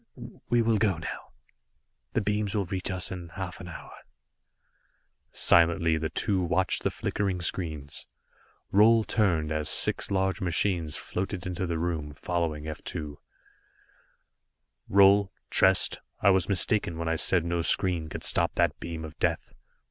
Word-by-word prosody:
We 120 -1 +3
will 110 -2 +1
go 100 -5 +1
now. 80 - -7 0.8
The 115 - +1
beams 105 0 -2
will 100 -2 0
reach 95 +1 -4
us 95 -2 -1
in 90 -2 -7
half 90 +1 -7
an 90 - -9
hour." 90 - -10 1.4
Silently, 85 -1 +3
the 80 0 -3
two 95 -3 0
watched 90 +1 +1
the - - 0
flickering 95 -3 -2
screens. 80 -5 -2 0.7
Roal 110 +3 +5
turned, 85 -8 0
as 75 -1 0
six - - +3
large 95 -1 -1
machines 85 -2 0
floated 95 0 -4
into 90 0 -3
the 85 -1 -2
room, 80 -3 -3
following 80 -3 -3
F 75 -1 -7
2. 75 -2 -6 1.7
"Roal 100 0 +5 0.2
Trest 95 -1 +4 0.2
I 100 - +4
was 95 0 +1
mistaken 100 -2 0
when 85 0 -4
I 80 - 0
said 85 +1 +3
no 85 0 -1
screen 85 -2 +2
could - - -7
stop - - +1
that - - +1
beam 80 -1 -6
of 80 0 -12
Death. - - -1
90 Hz, 150 wpm, -27 LUFS, 80-95 Hz, 1.7 s, Roal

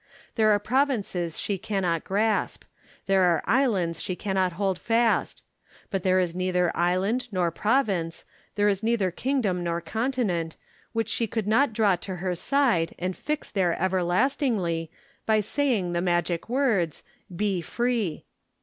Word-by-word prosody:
There 220 -2 +3
are 210 - +5
provinces 205 - -1
she 200 -2 -2
cannot 190 -6 -1
grasp; 210 +2 0 0.4
there 195 -1 +3
are 175 -3 +3
islands 195 - +1
she 185 - -3
cannot 190 -2 0
hold 190 0 -1
fast; 230 0 +1 0.5
but 195 - -1
there 185 +1 +3
is 175 -2 0
neither 180 -1 0
island 190 +8 +1
nor 180 -3 +1
province, 195 -5 0 0.3
there 205 0 +2
is 200 -1 +1
neither 220 -5 +1
kingdom 210 -5 -1
nor 170 0 -1
continent, 190 -3 -2 0.3
which 225 -2 -1
she 230 0 -1
could 220 0 -2
not 225 +5 +3
draw 210 -4 +2
to 190 +1 -6
her 180 0 -2
side 220 -5 +1
and 185 +1 -3
fix 300 -1 -4
there 180 -4 +1
everlastingly, 185 - 0 0.4
by 220 -1 +4
saying 215 -4 0
the 170 - 0
magic 175 +1 0
words, 230 - +1 0.3
Be 195 -1 0
Free. 235 -3 -1
195 Hz, 145 wpm, -26 LUFS, 175-225 Hz, 0.5 s, are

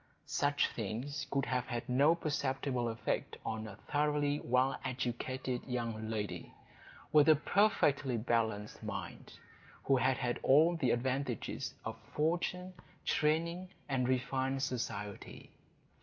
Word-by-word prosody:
Such 145 0 +2
things 130 +7 -4
could 135 0 0
have 125 -2 -1
had 120 -2 -3
no 140 +6 +5
perceptible 135 -5 -1
effect 115 0 -2
on 110 0 -3
a 100 - -8
thoroughly 145 +4 0
well 130 +2 +2
educated 130 0 -2
young 115 -3 -3
lady, 105 -2 -4 0.6
with 150 0 +6
a 155 - +9
perfectly 145 - +2
balanced 110 -2 -1
mind, - - -6 0.5
who 135 - +4
had 130 +1 +2
had 120 -1 -1
all 160 +6 +5
the 140 -7 +1
advantages 130 0 -1
of - - -5 0.2
fortune, 175 +4 0 0.3
training, 170 +4 +1 0.2
and 130 -3 +1
refined 130 +1 0
society. 105 -6 -4
130 Hz, 120 wpm, -34 LUFS, 120-145 Hz, 0.6 s, a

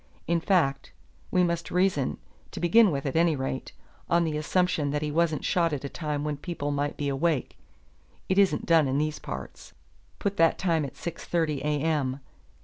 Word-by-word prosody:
In 170 0 +1
fact, 160 -6 +1 0.4
we 180 - +3
must 170 -1 -1
reason 180 -7 +1 0.3
to - - -7
begin 215 +5 +5
with, 140 -4 -2
at 135 - -2
any 165 -1 +3
rate 130 -1 -4 0.4
on 170 0 +3
the 160 -2 -1
assumption 155 -1 +1
that 145 +1 -1
he 150 - -2
wasn't 160 -1 +1
shot 170 -3 +2
at 145 - -3
a 140 - -4
time 150 -2 -3
when 150 -1 -2
people 145 -2 -4
might 145 0 -2
be 145 - -2
awake 140 +1 0 0.7
it 190 +1 +2
isn't 195 -1 +3
done 165 -4 +4
in 135 +1 0
these 155 +1 -1
parts. - - -8 0.4
Put 200 0 -2
that 165 0 +4
time 165 -5 +1
at 135 - -9
six 170 -1 -6
thirty 160 -5 0
A. 150 0 0
M. 145 -5 0
155 Hz, 190 wpm, -27 LUFS, 145-170 Hz, 0.7 s, begin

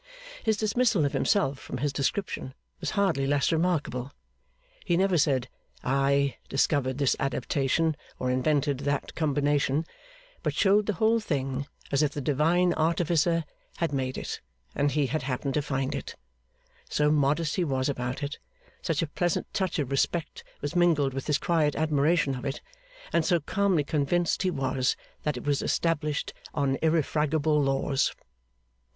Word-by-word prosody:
His 220 -2 +1
dismissal 215 -5 +2
of 140 - -1
himself 145 -11 +1
from - - -6
his 140 +2 -1
description, 140 -2 -2 0.2
was - - -2
hardly 165 -9 +2
less 145 -1 +2
remarkable. 160 -6 0 0.7
He 175 -2 +1
never 190 0 +3
said, 140 -5 +2 0.4
I 140 +1 +2
discovered 135 -2 +1
this 140 -3 +2
adaptation 135 +4 0 0.2
or 125 0 -1
invented 140 +1 +1
that 145 0 -2
combination; 145 0 +1 0.6
but - - -1
showed 205 +1 +3
the 210 - +1
whole 225 +4 +3
thing 140 -7 -2 0.2
as 140 +1 +3
if 150 -1 +1
the - - -4
Divine 160 +6 +2
artificer 165 0 +2 0.3
had 165 -3 -1
made 130 -1 -1
it, - - -5 0.3
and 145 - +1
he 150 -1 +2
had 155 +4 -1
happened 135 +1 -2
to 150 - +1
find 135 -2 -2
it; - - -5 0.7
so 150 0 +2
modest 150 +2 +2
he 180 - +2
was 130 -4 0
about 130 0 -3
it, 145 +2 -4 0.4
such 165 -3 0
a - - -2
pleasant 175 +3 -1
touch 190 -4 -1
of 140 -4 -2
respect 155 +4 -1 0.2
was 145 +4 -4
mingled 160 -6 +3
with 135 0 -5
his 150 -2 +3
quiet 155 -4 +1
admiration 155 -1 +2
of 125 - -6
it, 140 0 -3 0.5
and 170 - +3
so 175 +1 +2
calmly 185 0 +1
convinced 155 +4 0
he 185 - +2
was 135 -5 0 0.3
that 150 -4 -1
it - - -6
was 145 -1 +1
established 155 -3 0 0.2
on 140 -3 +1
irrefragable 155 -1 +2
laws. 135 0 +1
145 Hz, 155 wpm, -27 LUFS, 135-165 Hz, 0.7 s, never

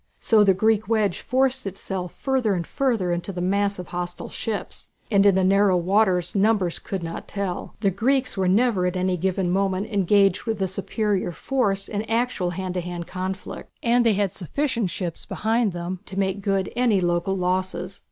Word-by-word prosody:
So 220 -2 +4
the 195 -2 +4
Greek 220 +1 +2
wedge 215 -5 +1
forced 260 -2 +1
itself 190 -1 -5
further 260 -7 0
and 170 -2 -2
further 230 -9 0
into 175 +3 -2
the 180 - -6
mass 200 +2 +1
of 180 - -8
hostile 175 0 -5
ships, 220 -3 -5 0.2
and 200 -1 +5
in 195 - +5
the 190 - +2
narrow 195 0 +4
waters 180 -1 +2
numbers 200 -4 +2
could 190 -3 -5
not 165 0 -6
tell. 200 -3 -4
The 200 -3 +2
Greeks 255 +7 +1
were 190 -2 0
never 200 -1 +3
at 180 +1 -2
any 185 0 +1
given 185 0 0
moment 195 +3 0
engaged 195 0 +3
with 225 -3 -2
a 190 - +1
superior 195 0 -1
force 200 -1 -1
in 205 -1 -2
actual 225 -5 0
hand 185 +1 -4
to 180 - -1
hand 175 -1 -5
conflict, 185 +2 -6
and 240 +1 +4
they 230 -2 +4
had 200 -2 0
sufficient 230 - -1
ships 175 -2 -4
behind 225 0 +1
them 175 +1 -5
to 190 - -7
make 195 0 0
good 195 -1 -1
any 235 -5 +3
local 175 +2 0
losses. 185 0 -2
195 Hz, 185 wpm, -24 LUFS, 180-215 Hz, 0.2 s, and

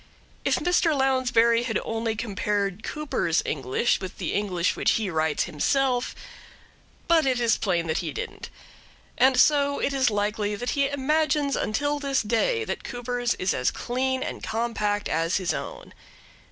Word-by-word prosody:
If - - +2
Mr. 345 -3 +2
Lounsbury 245 -3 +3
had 235 -2 -1
only 225 0 -2
compared 205 -2 -2
Cooper's 280 - -1
English 135 - 0
with 185 -2 -7
the - - -3
English 185 -4 0
which - - +2
he 215 -4 -1
writes 160 -1 +1
himself 250 - 0 0.9
but 325 -4 +4
it 255 -2 +1
is 235 -2 +3
plain 175 -4 0
that 160 +1 -1
he 165 -4 -3
didn't; - - -6 0.7
and 260 -1 +4
so 285 0 +4
it 280 - -1
is 265 -2 +3
likely 210 0 -1
that 245 +4 -3
he 280 -1 +1
imagines 290 +1 +1
until 290 +7 -1
this 275 -3 0
day 240 - +1
that - - -4
Cooper's 245 0 -2
is 185 - 0
as 125 - +1
clean 260 +1 -2
and - - -5
compact 215 -3 -1
as 165 +2 0
his 185 -3 -1
own. - - -7
235 Hz, 155 wpm, -25 LUFS, 205-270 Hz, 0.9 s, but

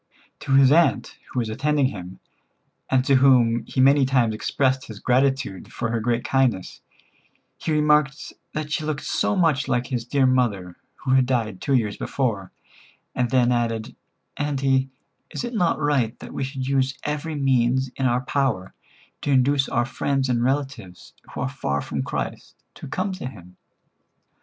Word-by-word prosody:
To 135 - -2
his 135 -1 +6
aunt, 170 +3 +2
who - - -8
was 115 -3 0
attending 145 +5 +1
him, 90 -3 -9 0.7
and 130 -1 +2
to 135 -1 +5
whom 125 -3 +4
he - - -4
many 140 +2 +5
times 125 -4 +2
expressed 130 +4 0
his 110 - -9
gratitude 130 -6 0
for 120 -1 -3
her 115 - 0
great 120 +1 0
kindness, 130 -9 0 0.8
he 160 - -3
remarked 150 -2 +2 0.2
that 150 -1 -4
she 155 - -1
looked 150 -2 -3
so - - 0
much 160 -7 +2
like 125 -1 0
his 125 -3 -3
dear 135 +3 +1
mother, 110 -9 +1 0.2
who 130 - -4
had 130 -1 +4
died 110 -7 -1
two 140 - +1
years 105 -5 0
before, 105 -9 -2 0.6
and 125 -1 0
then 125 -1 +3
added: 115 -2 -1 0.4
"Auntie, 135 -2 +1 0.4
is - - -5
it 240 0 -4
not 180 -7 +1
right 140 -6 0
that - - -10
we - - -3
should 135 -1 -4
use 135 -1 0
every 150 +1 -3
means 130 -2 +1
in 135 - 0
our 120 +1 +1
power 130 -9 -1 0.5
to - - -3
induce 135 +1 +3
our 120 0 +1
friends 135 0 -1
and 120 -1 +1
relatives 130 -9 -3 0.2
who - - -3
are 135 - 0
far 100 - -2
from - - -3
Christ, - - -5 0.2
to - - -10
come 185 +8 -2
to 185 -9 -5
Him?" 90 -7 -12
130 Hz, 170 wpm, -23 LUFS, 120-140 Hz, 0.8 s, his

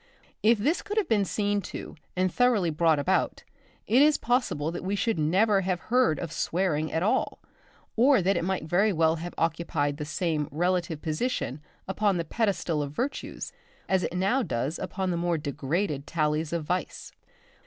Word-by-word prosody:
If 225 +2 +5
this 290 - +1
could 415 +1 -5
have 430 - +2
been 210 -3 +2
seen 205 +1 0
to, - - -8 0.2
and 185 -1 +1
thoroughly 230 -9 +3
brought 160 0 +3
about, 180 +7 0 0.4
it 245 +5 +4
is 300 0 +5
possible 235 - 0
that 175 - -6
we 195 +2 -1
should 200 -2 0
never 195 +6 +3
have 185 -1 -1
heard 245 - +2
of 170 0 -5
"swearing" 160 -4 0
at 160 - 0
all, 210 - +1 0.6
or 260 +3 +5
that 195 +2 +2
it - - 0
might 190 -1 -1
very 180 +7 +2
well 160 -2 +2
have 175 +2 -7
occupied 160 -3 0
the 150 - -4
same 160 -1 -1
relative 170 0 -1
position 155 - -2 0.3
upon 195 0 +1
the 170 - -2
pedestal 185 -6 0
of 140 -1 -4
virtues 265 - -4 0.3
as 190 -1 +2
it 180 - -3
now 195 +9 +2
does 135 - -2
upon 190 -2 -2
the 170 - -1
more 170 -1 0
degraded 145 +1 -2
tallies 155 -1 0
of 170 -2 -1
vice. 180 +4 -3
180 Hz, 175 wpm, -27 LUFS, 155-205 Hz, 0.6 s, If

